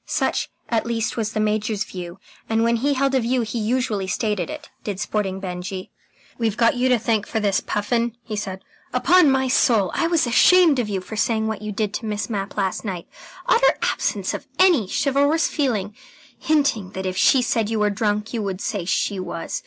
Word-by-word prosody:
Such, - - 0 0.2
at 230 -1 0
least, 230 -1 -1
was 220 -2 -2
the - - -1
Major's 215 0 0
view, 180 -3 -8 0.3
and 225 0 +2
when 235 0 +2
he 280 +4 +1
held 270 +1 +1
a 265 - +4
view 245 +1 0
he 230 +1 -3
usually 220 -3 -1
stated 205 -3 -1
it, - - -7 0.2
did 200 -3 -4
Sporting 200 -2 -2
Benjy. 185 0 -6 0.5
"We've 225 -2 0
got 230 -1 +4
you 250 +1 +1
to 250 - +4
thank 220 -2 0
for 225 - -1
this, 200 -3 +1
Puffin," 230 +2 -1
he 215 - -5
said. 190 -2 -5 0.3
"Upon 360 -4 +5
my 265 0 +2
soul, 230 -7 +3
I 330 - +1
was 335 -4 +2
ashamed 315 +4 +5
of 225 -3 -1
you 195 -2 -2
for 220 - -8
saying 220 0 +1
what 220 -2 -3
you 215 0 -4
did 210 0 -2
to 225 - -4
Miss 210 +2 -3
Mapp 200 -1 -4
last 190 -2 -1
night. 185 -5 -5 0.4
Utter - - +4
absence - - -1
of - - -6
any 350 - +4
chivalrous 285 +4 +2
feeling 215 - -1 0.4
hinting 280 -11 +1
that 190 0 -5
if 185 0 -2
she 250 +6 +4
said 225 -3 0
you 225 - -1
were 210 -1 +2
drunk, 210 +1 -1
you 230 - -1
would 195 -3 -3
say 200 -4 -3
she 195 +2 0
was. 175 -2 -4
220 Hz, 205 wpm, -22 LUFS, 200-245 Hz, 0.5 s, Upon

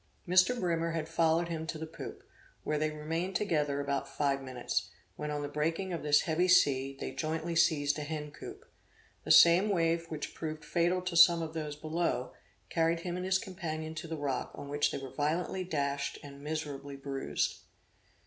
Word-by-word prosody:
Mr. 185 +7 +4
Brimer 170 -3 0
had 160 -1 -2
followed 165 +1 +2
him 160 -1 -4
to 165 - -3
the 160 - -5
poop, 160 - -9 0.4
where 150 -1 0
they 155 0 +1
remained 165 +5 -3
together 150 -8 +1
about 140 -1 -2
five 140 -2 0
minutes; 130 -2 -2 0.3
when 150 - -4
on 145 -1 -2
the - - -2
breaking 165 +6 -1
of 170 - -3
this 150 0 +4
heavy 170 +2 +1
sea, 135 -6 +4
they - - -4
jointly 160 +1 -2
seized 155 -4 +3
a - - -3
hen 150 0 -4
coop. - - -10 0.6
The - - 0
same 175 +5 +8
wave 165 -3 +1
which 155 -2 -5
proved 155 -1 -5
fatal 175 +2 +1
to 180 -1 -3
some 170 0 +7
of 160 0 -5
those 155 -2 -4
below, 155 -5 -2 0.4
carried 165 0 +2
him 175 0 -3
and 180 0 -3
his 190 0 +4
companion 160 -4 -5
to 160 +1 -6
the 160 0 -4
rock, 140 -3 -2
on 140 - -8
which 145 +1 +2
they - - -3
were 135 -2 -8
violently 165 +5 -1
dashed 140 -5 -2
and 140 -1 -10
miserably 145 -2 -4
bruised. 135 - -2
155 Hz, 185 wpm, -31 LUFS, 145-170 Hz, 0.6 s, same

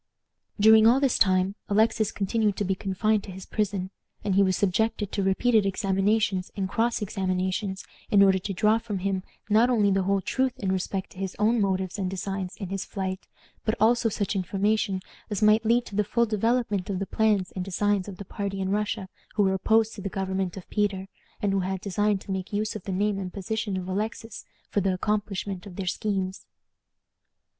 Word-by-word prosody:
During 220 +1 +7
all 245 +3 +5
this 275 -3 +2
time 185 0 +3 0.2
Alexis 220 +1 +2
continued 210 +1 0
to 205 - -1
be 190 - +1
confined 200 +2 0
to 195 - -8
his 185 0 -9
prison, 195 -3 -2 0.3
and 205 -2 0
he 195 - +5
was 185 -2 +2
subjected 205 +1 0
to 200 - -1
repeated 210 +4 +3
examinations 195 0 +1
and 195 -1 0
cross 230 +2 0
examinations, 190 0 -2 0.2
in 200 -1 +6
order 190 -1 +4
to 195 +2 -4
draw 215 +4 +3
from 225 -3 -4
him 190 0 -1 0.3
not 220 +4 +4
only 210 -5 +3
the 195 0 +2
whole 195 +1 +1
truth 260 +6 -1
in 190 -2 -1
respect 190 0 -2
to 185 - -13
his 190 -1 -3
own 220 +2 +3
motives 190 -1 -1
and 185 -2 -1
designs 190 0 -4
in 195 -4 -6
his 195 0 -3
flight, 190 -1 -4 0.4
but 220 - 0
also 230 +2 +4
such 205 -1 -2
information 195 +1 0 0.3
as 210 0 -1
might 215 +1 +5
lead 235 +2 +3
to 200 - -9
the 210 - +3
full 235 +4 +1
development 220 -2 0
of 195 - -1
the 195 - -2
plans 210 -3 +1
and 185 - -2
designs 200 +1 0
of 195 -3 -8
the 200 - -8
party 195 0 -4
in 190 0 -1
Russia 210 -1 -1 0.3
who 210 - +3
were 190 -1 +2
opposed 220 +3 +2
to 200 - -8
the 200 - -3
government 190 -1 -2
of 185 - -9
Peter, 195 -2 0 0.3
and 200 -1 +2
who 195 - +2
had 190 +1 -2
designed 205 +1 0
to - - -7
make 190 -1 -3
use 215 +2 -1
of 210 - -7
the 195 - -3
name 200 +1 0
and 185 -2 -5
position 205 0 -2
of 185 -1 -5
Alexis 215 +4 -4 0.2
for 205 - 0
the 195 0 +1
accomplishment 200 -1 -2
of 185 - -10
their 195 - -4
schemes. 190 0 -2
200 Hz, 200 wpm, -26 LUFS, 190-215 Hz, 0.4 s, During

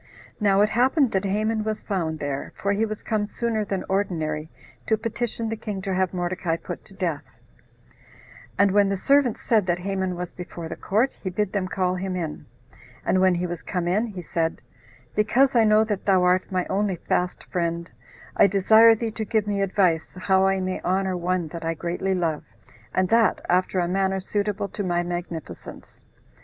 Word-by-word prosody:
Now 200 -2 +4
it 210 - +4
happened 255 +3 +3
that 190 +1 0
Haman 215 +2 0
was 215 0 -3
found 170 -6 -2
there, 145 -2 -4
for 200 0 0
he 220 +2 +1
was 215 -1 -6
come 215 -2 -1
sooner 225 -1 -1
than 195 -2 -3
ordinary 160 -6 -1 0.4
to 220 - +3
petition 230 0 -3
the 225 - -2
king 215 -3 -5
to 195 -1 -2
have 185 -1 +1
Mordecai 175 -2 -1
put - - -7
to 195 - -14
death; 170 -6 -2 1.3
and 200 -1 +4
when 200 0 +4
the 195 - 0
servants 275 +2 +2
said 215 -5 +2
that 175 -1 +2
Haman 190 0 -2
was 175 0 -5
before 175 -2 -7
the - - -5
court, 225 +7 0
he 190 - -3
bid 195 +2 -2
them 195 -3 0
call 185 -1 0
him 185 0 -3
in; 165 -4 -5 0.6
and 185 - +2
when 185 -1 +4
he 175 +1 -1
was 175 -1 -4
come 180 -2 -3
in, 210 +7 +1
he 190 -5 -7
said, 165 0 -2 0.5
"Because 250 +5 +3
I 230 -2 +5
know 215 0 +5
that 210 -3 -3
thou 190 -2 +4
art 180 +1 +2
my 185 -1 0
only 200 -1 0
fast 180 +1 -2
friend, 170 -1 -2 0.4
I - - +6
desire 220 +4 +6
thee 225 0 -3
to 220 0 -4
give 215 0 0
me 200 -1 -1
advice 185 -5 +1
how 190 0 +3
I 195 0 +1
may 185 0 -2
honor 190 +1 0
one 180 -1 -1
that 165 +1 -7
I 165 0 -1
greatly 175 +4 -2
love, 165 -4 -1 0.5
and 185 0 +1
that 230 -1 +4
after 185 +1 +1
a 175 - +1
manner 190 +1 0
suitable 205 +1 -2
to - - -5
my 175 -2 0
magnificence." 175 -2 -7
190 Hz, 195 wpm, -24 LUFS, 180-210 Hz, 1.3 s, I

